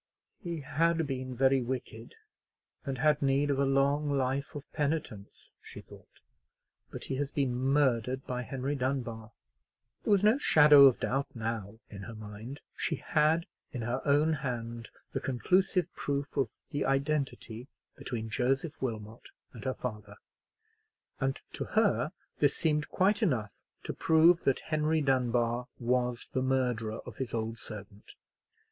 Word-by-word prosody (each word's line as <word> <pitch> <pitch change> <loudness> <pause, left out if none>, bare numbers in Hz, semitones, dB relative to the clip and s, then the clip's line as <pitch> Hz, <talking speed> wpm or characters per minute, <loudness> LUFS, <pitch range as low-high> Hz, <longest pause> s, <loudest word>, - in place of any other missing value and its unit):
"He 170 -5 -4
had 165 +4 +1
been 130 -2 -4
very 135 +1 +3
wicked, 130 - -5 0.7
and 135 -2 -3
had 150 +3 +3
need 140 +1 +2
of 135 - 0
a 140 - +3
long 140 +2 +2
life 140 +1 -1
of 145 - -5
penitence," 140 -9 -3
she - - -10
thought; - - -16 0.7
"but - - -8
he 130 - -3
has 145 0 -2
been 135 -4 0
murdered 130 -1 +1
by 125 -1 -3
Henry 135 +3 -3
Dunbar." 125 -5 -3 0.7
There - - -3
was 200 -1 +4
no 220 +6 +5
shadow 150 - +8
of 130 -3 +5
doubt 135 +2 -1
now 110 -2 -4
in 100 -2 -9
her 115 +3 -8
mind. 110 +6 -9
She - - -1
had 160 +2 +2 0.3
in 125 -5 -4
her 120 +3 -2
own 150 +2 +3
hand 120 -5 -4 0.2
the - - 0
conclusive 180 +7 +1
proof 140 0 -3
of 135 -5 +1 0.2
the 145 -1 -1
identity 135 -4 -1 0.3
between 110 -3 -5
Joseph 135 +6 0
Wilmot 110 -2 -5 0.2
and 115 -4 -10
her 130 - -1
father; 105 -4 -6 1.0
and 135 0 -1
to - - -3
her 205 -7 +3 0.3
this 145 -1 +3
seemed 150 -2 0
quite 200 +2 +2
enough 120 - +1 0.3
to - - -4
prove 165 +2 +4
that 135 - +2
Henry 155 0 +1
Dunbar 125 -3 +1
was 125 0 0
the 130 - -1
murderer 125 -4 0
of - - -10
his 130 -3 -3
old 115 0 -3
servant. 105 -1 -10
135 Hz, 150 wpm, -30 LUFS, 120-145 Hz, 1.0 s, shadow